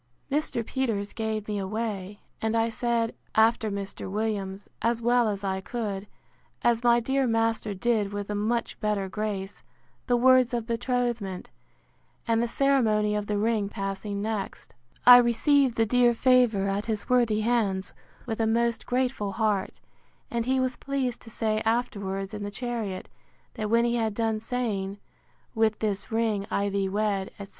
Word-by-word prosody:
Mr. 285 -5 -1
Peters 220 -7 -2
gave 220 -2 -3
me 210 -1 -2
away; 205 -1 -4 0.2
and 220 0 0
I 225 0 +2
said, 230 0 0 0.2
after 220 0 +4
Mr. 200 -1 -5
Williams, 200 -2 -3
as 230 0 +1
well 240 0 +3
as 200 -1 -3
I 190 -1 -1
could, 205 -2 -4 0.6
as 235 0 +2
my 240 0 +5
dear 265 +2 +1
master 225 -2 0
did 210 0 0
with 205 0 -4
a - - -1
much 225 +3 -1
better 210 -2 0
grace, 200 -1 -4 0.5
the 245 -1 +3
words 255 0 +5
of 235 -2 -2
betrothment; 235 -5 -2 0.8
and 230 0 +2
the 235 - +1
ceremony 225 -6 +2
of 210 -1 -2
the 210 - 0
ring 215 -1 +1
passing 200 0 -4
next, 215 -3 -4 0.3
I 245 0 +11
received 245 +2 +3
the 225 - +4
dear 240 +1 +3
favour 245 -6 +3
at 200 +2 -2
his 215 -2 -2
worthy 235 -4 +3
hands 210 -5 0 0.3
with 225 -3 -4
a 225 - +2
most 235 +1 +1
grateful 245 -5 -1
heart; 215 -4 -1 0.5
and 235 0 -1
he 260 0 +2
was 255 -1 -1
pleased 265 -3 -2
to 225 - -13
say 215 -1 -1
afterwards 200 -4 -1
in 210 - -5
the 205 - -3
chariot, 220 -3 -4 0.5
that 215 -1 -3
when 235 +1 +4
he 240 0 +1
had 220 -2 -1
done 225 -1 0
saying, 215 -4 -2 0.6
With 220 -2 +2
this 210 +1 -2
ring 220 -3 0
I 200 -2 0
thee 195 -1 0
wed, 200 -1 0
etc. 200 -1 -8
220 Hz, 165 wpm, -27 LUFS, 205-240 Hz, 0.8 s, I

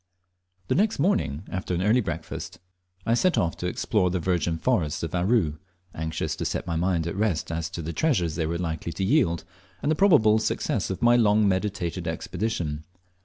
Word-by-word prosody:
The - - +1
next 215 +3 +2
morning, 140 - +1
after 95 -1 -2
an 90 - -1
early 110 +5 +4
breakfast, 85 -5 -5 0.5
I 115 - +2
set 180 +9 +2
off 85 -1 +1
to 90 - -3
explore 90 +1 +1
the 90 +1 -1
virgin 85 -1 0
forests 85 -7 0
of 80 -1 -4
Aru, 90 -4 +1 0.3
anxious 80 0 -3
to - - -3
set - - -2
my 85 -2 -2
mind 85 -1 +1
at 85 - -3
rest 100 -7 0
as 80 0 -2
to 85 -1 -6
the 85 +2 -4
treasures 105 - +1
they 80 0 -1
were 85 +1 -1
likely 85 -1 -3
to 90 - -3
yield, 100 - +2 0.4
and 145 - 0
the - - +3
probable 145 - +5
success - - -1
of 95 - -4
my 120 0 +6
long 105 -3 +4
meditated 95 -3 -1
expedition. 80 -3 -3
90 Hz, 190 wpm, -26 LUFS, 80-110 Hz, 0.5 s, my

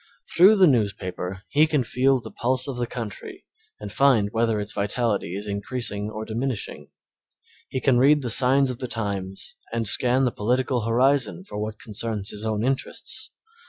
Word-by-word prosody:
Through 190 +5 +7
the 195 -3 +6
newspaper 95 - -1
he 150 +2 +3
can 150 -4 +1
feel 130 +3 +2
the - - -10
pulse 130 +3 0
of 135 -3 -4
the 120 -1 -1
country 115 -5 -7 0.3
and 105 -1 -7
find 125 -7 +3
whether 115 -1 +1
its 105 +1 -2
vitality 100 -3 -1
is 100 +1 -5
increasing 105 0 -3
or 110 0 -6
diminishing; 115 +1 -4 0.8
he 130 - -2
can 130 -2 +3
read 145 +2 +4
the 120 - +1
signs 130 +3 +4
of 125 - -7
the 125 - -4
times 100 -5 -4 0.2
and 115 -1 -1
scan 125 +5 +4
the 125 - +1
political 125 +3 0
horizon 130 - +2
for 105 - -7
what 105 0 -4
concerns 105 -2 -4
his 105 0 -6
own 110 -1 -1
interests. 130 +1 -3
115 Hz, 170 wpm, -24 LUFS, 105-130 Hz, 0.8 s, Through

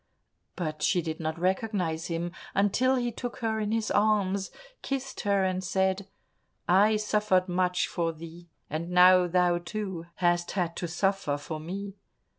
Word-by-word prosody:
But 155 -4 -4
she 180 -3 +2
did 160 -1 -4
not 160 0 -3
recognize 180 -3 -1
him 170 0 -3 0.2
until 230 +7 +3
he 240 -2 -1
took 245 +1 -6
her 220 -2 -1
in 210 0 -1
his 225 -1 0
arms, 200 -2 +2 0.3
kissed 270 -1 -4
her, 200 -1 +2
and 185 0 -1
said, 190 +1 0 0.6
"I 205 +4 +5
suffered 210 -3 +1
much 180 0 +1
for 170 -2 -1
thee 165 +2 -11 0.2
and 160 +3 -4
now 180 0 +6
thou, 175 0 +2
too, 180 -2 -5
hast 175 -1 +1
had 175 -3 -1
to 175 - -2
suffer 190 -3 0
for 155 +2 -6
me." 195 +5 -6
185 Hz, 155 wpm, -28 LUFS, 170-205 Hz, 0.6 s, now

